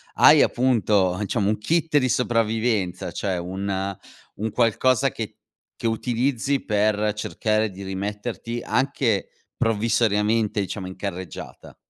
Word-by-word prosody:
hai -, -, +7 dB
appunto, 105 Hz, -7 st, +2 dB
diciamo, 100 Hz, 0 st, 0 dB
un 110 Hz, -, +1 dB
kit 160 Hz, +6 st, +1 dB
di 130 Hz, -, 0 dB
sopravvivenza, 115 Hz, -5 st, 0 dB
cioè 95 Hz, -3 st, -2 dB
un 95 Hz, +2 st, -3 dB, 0.4 s
un 110 Hz, +2 st, -2 dB
qualcosa 120 Hz, +2 st, +2 dB
che -, -, -6 dB, 0.4 s
che 115 Hz, -, -2 dB
utilizzi 125 Hz, +4 st, 0 dB
per 105 Hz, 0 st, +1 dB
cercare 110 Hz, +1 st, 0 dB
di 95 Hz, 0 st, -9 dB
rimetterti 105 Hz, +5 st, -4 dB
anche, 130 Hz, -6 st, 0 dB, 0.3 s
provvisoriamente 110 Hz, -1 st, +1 dB
diciamo, 95 Hz, 0 st, -5 dB
in 95 Hz, -, -8 dB
carreggiata? 95 Hz, -4 st, -7 dB
110 Hz, 115 wpm, -24 LUFS, 100-120 Hz, 0.4 s, hai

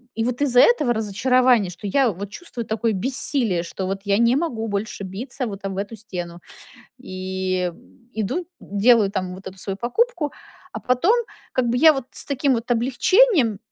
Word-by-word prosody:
и 225 Hz, -, -1 dB
вот 250 Hz, +2 st, -2 dB
из-за 250 Hz, -3 st, +5 dB
этого 300 Hz, -, +4 dB
разочарования, 230 Hz, 0 st, +2 dB
что 180 Hz, +3 st, -10 dB
я 260 Hz, +5 st, +3 dB
вот 200 Hz, +2 st, -7 dB
чувствую 245 Hz, -6 st, -7 dB
такое 220 Hz, +1 st, -1 dB
бессилие, 235 Hz, -, 0 dB
что 175 Hz, +2 st, -5 dB
вот 195 Hz, +1 st, -3 dB
я 200 Hz, 0 st, +2 dB
не 235 Hz, +2 st, +4 dB
могу 255 Hz, -8 st, -2 dB
больше 205 Hz, 0 st, -3 dB
биться 235 Hz, +8 st, -5 dB
вот 200 Hz, -2 st, -7 dB
об 195 Hz, -1 st, -4 dB
эту 200 Hz, +3 st, -4 dB
стену, 180 Hz, -5 st, -7 dB, 0.6 s
и 185 Hz, -4 st, -3 dB, 0.4 s
иду, 220 Hz, -, -2 dB
делаю, 205 Hz, +1 st, +3 dB
там, 185 Hz, -2 st, -3 dB
вот 190 Hz, +1 st, -13 dB
эту 190 Hz, 0 st, -13 dB
свою 195 Hz, 0 st, -4 dB
покупку, 300 Hz, -, 0 dB, 0.4 s
а -, -, -6 dB
потом 255 Hz, -, +2 dB, 0.4 s
как 255 Hz, -1 st, +1 dB
бы 235 Hz, -, +1 dB
я 315 Hz, +3 st, +8 dB
вот 270 Hz, -4 st, -4 dB
с -, -, -3 dB
таким 275 Hz, -1 st, +1 dB
вот 235 Hz, +1 st, -4 dB
облегчением 255 Hz, -, +3 dB
225 Hz, 175 wpm, -22 LUFS, 195-255 Hz, 0.6 s, я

